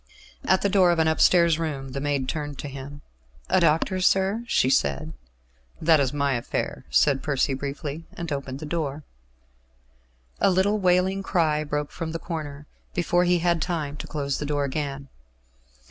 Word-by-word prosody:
At 190 - +3
the - - +4
door 190 -2 +4
of 170 - +2
an 160 0 +3
upstairs 165 +1 +4
room 140 -5 -3
the 135 +1 -5
maid 140 -2 -1
turned 145 -2 -4
to 145 - -6
him. 140 +1 -9 0.5
"A - - +4
doctor, 175 +5 +2
sir?" 195 +5 +2
she 130 - +2
said. 155 +4 +1 0.7
"That 160 -1 +4
is 135 -3 +1
my 140 -1 0
affair," 120 -1 -3
said 140 -2 +3
Percy 140 -1 0
briefly, 145 +3 -5
and 170 -2 -6
opened 140 -2 -4
the - - -5
door. 150 -2 -3 1.4
A - - +4
little 195 +3 +2
wailing 185 +1 +2
cry 160 -6 +1
broke 150 0 -3
from 165 -1 -5
the - - -1
corner, 150 -4 -6 0.3
before 175 0 +2
he 180 0 +3
had 170 -1 +1
time 155 -4 -2
to - - -7
close 140 -3 -2
the 150 - -3
door 145 -1 0
again. 140 0 -4
155 Hz, 170 wpm, -25 LUFS, 140-175 Hz, 1.4 s, the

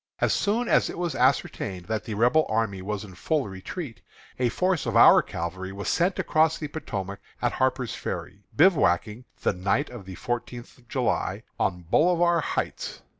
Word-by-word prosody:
As - - +2
soon 230 +4 +1
as - - +3
it - - -6
was 175 -2 -1
ascertained 105 -8 0
that 110 +1 -3
the 110 - -4
Rebel 125 +9 +3
army 110 -4 0
was 105 +1 -4
in 100 -3 -11
full 145 - -1
retreat, 115 - -7 0.4
a 125 -1 +2
force 180 +5 0
of - - -1
our - - +8
cavalry 95 +3 -5
was 100 +1 -4
sent 180 +3 +1
across 160 0 +2
the 150 - -4
Potomac 100 -10 -5 0.2
at - - +1
Harper's 130 -2 0
Ferry, 100 - -5
bivouacking, 125 - +3 0.2
the - - +2
night 100 +11 0
of 120 -6 -9
the 95 - -7
fourteenth 120 +2 -5
of 120 - -24
July, 130 -2 -1 0.2
on 90 0 0
Bolivar 170 - +3
Heights. - - -3
120 Hz, 175 wpm, -26 LUFS, 100-155 Hz, 0.4 s, our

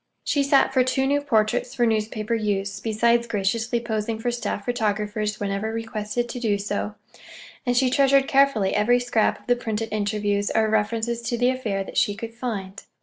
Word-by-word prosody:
She 285 - +1
sat 275 -1 +3
for 260 -1 +4
two 260 +1 0
new 285 +1 +2
portraits 245 -1 0
for 240 -2 +2
newspaper 215 0 -1
use, 200 -3 -1
besides 235 +2 +2
graciously 225 +3 0
posing 220 -1 -2
for 240 +2 -1
staff 235 -4 -3
photographers 215 -2 -1
whenever 200 +2 -2
requested 225 +1 -3
to 245 - -5
do 215 -4 +1
so; 205 +1 -3 0.7
and 245 0 +2
she 255 0 +3
treasured 275 0 +4
carefully 270 -8 +3
every 230 +4 +3
scrap 240 -3 +1
of - - -24
the 245 - +3
printed 225 -2 -3
interviews 205 -1 0
or 220 0 +3
references 225 +2 0
to 235 0 -2
the 245 +2 +3
affair 215 -7 -2
that - - -8
she 205 - +2
could 225 +2 -7
find. 215 -5 -5
225 Hz, 180 wpm, -24 LUFS, 210-245 Hz, 0.7 s, for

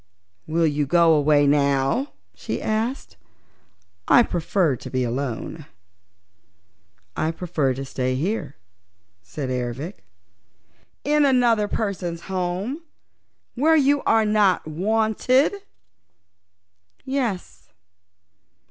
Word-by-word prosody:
"Will 165 +1 +1
you 145 -2 0
go 170 +1 +4
away 145 -1 +3
now?" 140 - +1 0.2
she - - -5
asked. 225 +5 -3 0.9
"I 240 - +6
prefer 170 - 0
to - - -9
be 130 -1 -1
alone." 130 +4 -4 1.5
"I 155 - 0
prefer 160 -6 -1
to 135 +1 -5
stay 130 -1 -2
here," 190 +12 -3 0.7
said 130 +9 -6
Ervic. 125 - -4 1.0
"In 300 +1 +2
another 240 -6 +3
person's 185 -6 -3
home, 190 - -3 0.7
where 310 +6 +3
you 285 -1 +3
are 225 -1 +3
not 210 -5 +2
wanted?" 220 - +1 1.5
"Yes." 250 -9 -3
175 Hz, 95 wpm, -23 LUFS, 145-225 Hz, 1.5 s, I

